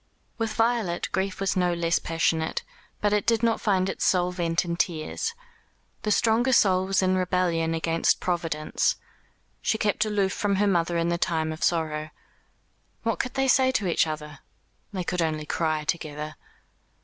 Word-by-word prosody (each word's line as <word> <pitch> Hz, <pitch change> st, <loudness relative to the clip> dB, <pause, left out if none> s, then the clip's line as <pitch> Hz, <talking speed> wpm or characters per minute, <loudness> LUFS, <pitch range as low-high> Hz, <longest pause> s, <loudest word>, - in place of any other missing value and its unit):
With 225 Hz, -1 st, -1 dB
Violet 225 Hz, -7 st, +1 dB
grief 190 Hz, 0 st, -1 dB
was 195 Hz, -1 st, 0 dB
no 180 Hz, -1 st, +2 dB
less 170 Hz, 0 st, +1 dB
passionate; 165 Hz, -1 st, 0 dB, 0.4 s
but 205 Hz, 0 st, +2 dB
it 210 Hz, -, +1 dB
did 230 Hz, 0 st, +2 dB
not 230 Hz, -1 st, +2 dB
find 190 Hz, -3 st, +2 dB
its -, -, -3 dB
sole 180 Hz, -1 st, +2 dB
vent 170 Hz, -1 st, 0 dB
in 170 Hz, 0 st, -2 dB
tears. 175 Hz, -, -2 dB, 0.7 s
The 215 Hz, -, -2 dB
stronger 230 Hz, +4 st, +3 dB
soul 190 Hz, -4 st, +4 dB
was 195 Hz, 0 st, +2 dB
in 185 Hz, 0 st, +2 dB
rebellion 180 Hz, -3 st, +1 dB
against 165 Hz, 0 st, +1 dB
Providence. 165 Hz, -4 st, 0 dB, 0.7 s
She 220 Hz, -, +1 dB
kept 210 Hz, 0 st, +1 dB
aloof 205 Hz, -3 st, 0 dB
from 205 Hz, -1 st, 0 dB
her 205 Hz, +2 st, +2 dB
mother 170 Hz, -3 st, +1 dB
in 170 Hz, 0 st, +1 dB
the 170 Hz, 0 st, 0 dB
time 160 Hz, -2 st, 0 dB
of 155 Hz, -, -7 dB
sorrow. 155 Hz, -2 st, 0 dB, 0.9 s
What 230 Hz, -1 st, -1 dB
could 255 Hz, -, -3 dB
they 270 Hz, 0 st, +1 dB
say 260 Hz, 0 st, +4 dB
to 210 Hz, -, 0 dB
each 170 Hz, -2 st, +2 dB
other? 150 Hz, -2 st, -6 dB, 0.5 s
They 190 Hz, -3 st, -3 dB
could 180 Hz, 0 st, -1 dB
only 155 Hz, -2 st, -1 dB
cry 155 Hz, -1 st, -1 dB
together. 150 Hz, -1 st, -3 dB
180 Hz, 170 wpm, -26 LUFS, 165-205 Hz, 0.9 s, soul